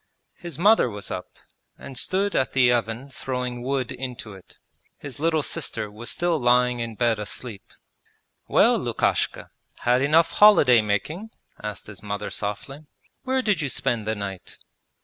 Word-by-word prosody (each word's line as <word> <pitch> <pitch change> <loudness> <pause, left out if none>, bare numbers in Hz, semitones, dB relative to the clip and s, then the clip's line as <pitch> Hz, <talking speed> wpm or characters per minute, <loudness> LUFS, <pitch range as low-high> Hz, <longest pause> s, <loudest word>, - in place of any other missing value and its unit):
His 170 -5 -8
mother 205 - +5
was 105 -2 -7
up, 90 - -4 0.5
and 135 - -10
stood 195 +9 0
at 130 - +1
the 125 -2 +5
oven 120 +3 -2
throwing 125 -2 -4
wood 130 -1 -2
into 125 -4 -6
it. 95 -2 -16 0.4
His 145 -1 -8
little 160 -1 +1
sister 115 -11 -3
was 115 +3 -7
still 175 -2 0
lying 125 0 +3
in 115 -1 -4
bed 115 -1 +1
asleep. 105 0 -6 0.8
'Well, - - +4
Lukashka, - - -1 0.3
had 125 +1 +3
enough 160 +4 +4
holiday 145 - +7
making?' 150 - -2 0.3
asked 105 -1 -5
his 105 -2 -11
mother 100 -1 -4
softly. 135 +9 -5 0.4
'Where 260 0 +1
did 205 -8 +1
you 145 - -1
spend 115 -3 -1
the 110 - 0
night?' 100 -3 -7
125 Hz, 150 wpm, -24 LUFS, 110-150 Hz, 0.8 s, holiday